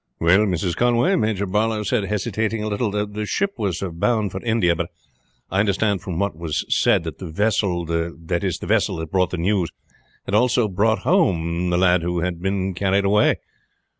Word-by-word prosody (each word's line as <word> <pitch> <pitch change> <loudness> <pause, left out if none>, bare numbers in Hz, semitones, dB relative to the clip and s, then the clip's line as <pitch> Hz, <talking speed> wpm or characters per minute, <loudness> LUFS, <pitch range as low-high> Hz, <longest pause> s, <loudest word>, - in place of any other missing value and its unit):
"Well, 95 +6 +4
Mrs. 90 -1 -1
Conway," 120 +10 +2
Major 110 - 0
Barlow 105 +2 0
said, 105 0 0
hesitating 105 +2 -2
a - - -2
little, 105 +2 -1
"the 105 +1 -3
ship 200 - 0
was 100 -4 -2
bound 105 +3 0
for 95 - -5
India; 110 -7 +2
but 85 +1 -3 0.6
I 95 - +1
understood 100 -1 +1
from 90 -3 -5
what 100 -4 -1
was 80 -1 -3
said - - +3
that 80 -3 -7
the 90 - -6
vessel, 95 -1 0
that 85 +1 -2
is 95 -4 -1
the - - -8
vessel - - +1
that 80 -1 -6
brought 90 -2 +2
the 90 - -4
news, 90 0 0 0.6
had - - -5
also 120 +1 +3
brought 110 +3 +1
home 90 - +1
the 85 - +1
lad 90 -1 +3
who 85 0 -1
had 85 -1 -3
been 95 0 -1
carried 100 +2 +1
away." 105 +2 +4
95 Hz, 190 wpm, -22 LUFS, 85-105 Hz, 0.6 s, Well